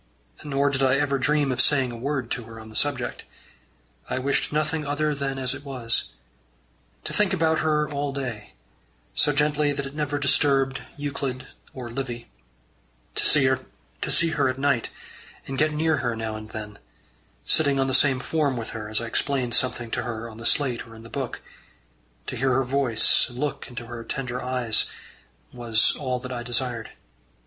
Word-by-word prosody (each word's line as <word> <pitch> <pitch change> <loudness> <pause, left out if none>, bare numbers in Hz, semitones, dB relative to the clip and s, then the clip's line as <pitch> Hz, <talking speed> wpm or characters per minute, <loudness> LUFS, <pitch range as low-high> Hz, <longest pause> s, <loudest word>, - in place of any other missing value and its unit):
Nor 140 -1 +1
did 135 -1 0
I 130 -1 +4
ever 140 -1 +1
dream 145 0 +2
of 130 0 +2
saying 135 -2 +4
a - - -6
word 130 0 -2
to 120 -1 -2
her 115 0 -10
on 110 0 -10
the 110 - -13
subject. 135 -3 0 0.9
I - - -1
wished 135 +2 +2
nothing 155 +1 0
other 150 +1 0
than 140 -1 -2
as 130 -1 0
it 140 0 -8
was. 125 -5 0 0.9
To - - -2
think 205 -2 +3
about 160 -3 +2
her 150 -1 +2
all 145 -1 -2
day, 125 -6 -5 0.6
so 145 - +4
gently 150 0 +2
that 140 0 -2
it 135 - -7
never 150 -1 -1
disturbed 135 -1 +2 0.2
Euclid 140 -3 -3 0.3
or 125 -3 -6
Livy; 120 -2 -4 0.9
to - - 0 0.9
see 165 +4 +5
her 140 -4 +2
at 130 - -2
night, 135 -4 +1 0.6
and 135 -1 -4
get 155 +1 +3
near 155 +1 +2
her 120 -4 -1
now 110 -1 -3
and 110 0 -8
then, 105 -2 -7 0.7
sitting 140 -3 +4
on 135 - +3
the 135 - -1
same 135 -1 +4
form 145 -1 0
with 115 - -4
her 105 -1 -6
as 110 - +1
I - - -3
explained 125 +1 0
something 120 -2 0
to - - 0
her 115 -1 -4
on 110 -1 -11
the 120 - -1
slate 130 -5 +1
or 115 - -12
in 110 - -12
her 115 - -11
book; 135 -4 -4 0.8
to - - -4
hear 130 +1 +2
her 135 +1 +3
voice, 130 -3 +3
and 120 - -11
look 145 +2 -2
into 120 -1 -7
her 115 0 -7
tender 125 0 -4
eyes, 125 -3 +2 0.6
was 115 -2 +2
all 130 -3 -2
that 125 0 -6
I 120 - -3
desired. 120 -1 -1
135 Hz, 185 wpm, -25 LUFS, 120-145 Hz, 0.9 s, see